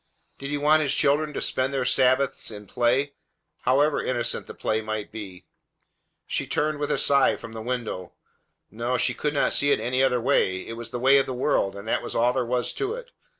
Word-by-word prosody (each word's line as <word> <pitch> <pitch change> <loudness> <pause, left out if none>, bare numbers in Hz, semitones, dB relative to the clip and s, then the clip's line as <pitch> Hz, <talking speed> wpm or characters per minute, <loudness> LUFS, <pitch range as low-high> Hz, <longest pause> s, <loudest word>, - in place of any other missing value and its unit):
Did 140 - -5
He 145 - -1
want 150 +2 +4
His 140 -3 +1
children 150 +2 +2
to - - -3
spend 130 +1 0
their 135 -2 -1
Sabbaths 130 +2 +2
in 105 -2 -9
play, 125 +7 +1 0.5
however 145 +4 +2
innocent 120 -2 -2
the - - -9
play 110 0 -1
might 110 -1 -4
be? 95 -4 -9 0.8
She - - -2
turned 150 0 0
with 145 - -2
a - - +1
sigh 140 -1 +4
away - - -1
from 115 - -10
the 110 - -6
window. 115 -7 -4 0.6
No, 120 +3 -1
she 125 - +2
could 150 +4 -2
not - - +2
see 145 - +2
it - - +3
any 130 +2 0
other 130 -2 +3
way. 105 -7 +1
It 115 - -5
was 115 0 -7
the 125 - -4
way 135 +3 +5
of 135 - 0
the 130 - -4
world, 125 -6 0
and 100 +2 -9
that - - +1
was - - -6
all 120 +2 +3
there 130 - 0
was 120 0 -1
to 405 +2 -2
it. - - -10
125 Hz, 225 wpm, -25 LUFS, 115-140 Hz, 0.8 s, way